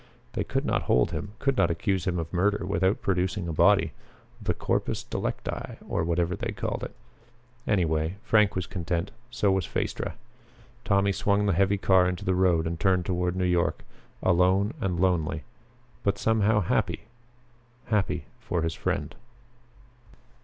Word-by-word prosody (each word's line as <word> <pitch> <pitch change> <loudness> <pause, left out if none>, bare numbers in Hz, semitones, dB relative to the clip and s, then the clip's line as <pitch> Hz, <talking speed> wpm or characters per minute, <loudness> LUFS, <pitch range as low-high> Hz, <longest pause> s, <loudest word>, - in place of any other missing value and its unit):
They - - -1
could - - -2
not - - +1
hold 60 - +3
him, 100 +3 -5
could 135 -1 +1
not 85 - +4
accuse 95 +2 -1
him 90 -1 0
of 80 0 -4
murder 100 +2 +1
without 95 +2 +1
producing 95 0 0
a 80 - -2
body - - +4 0.5
the - - 0
corpus - - -1
delicti, - - -4
or - - 0
whatever 85 +1 0
they - - -4
called - - -3
it. - - -6 0.7
Anyway, 80 -3 +1
Frank 105 -4 +3
was 90 -2 -1
content. 85 0 -3 0.2
So 105 -4 +1
was 95 -1 0
Phaestra. - - -3 0.7
Tommy 100 0 +2
swung 100 +1 +1
the 100 - +2
heavy 100 +3 +2
car 95 -2 +4
into 90 -1 -5
the 95 - +2
road 90 -3 +3
and 80 0 -3
turned 95 -1 +2
toward 90 0 0
New 95 0 0
York, 90 -1 +1 0.4
alone 95 +4 +3
and 90 -5 -1
lonely 80 -4 +1 0.6
but 100 - +1
somehow 110 -1 +2
happy; 90 - 0 0.8
happy 95 -7 0
for 85 -2 -2
his 80 0 -1
friend. 75 -1 -2
90 Hz, 155 wpm, -27 LUFS, 85-100 Hz, 0.8 s, not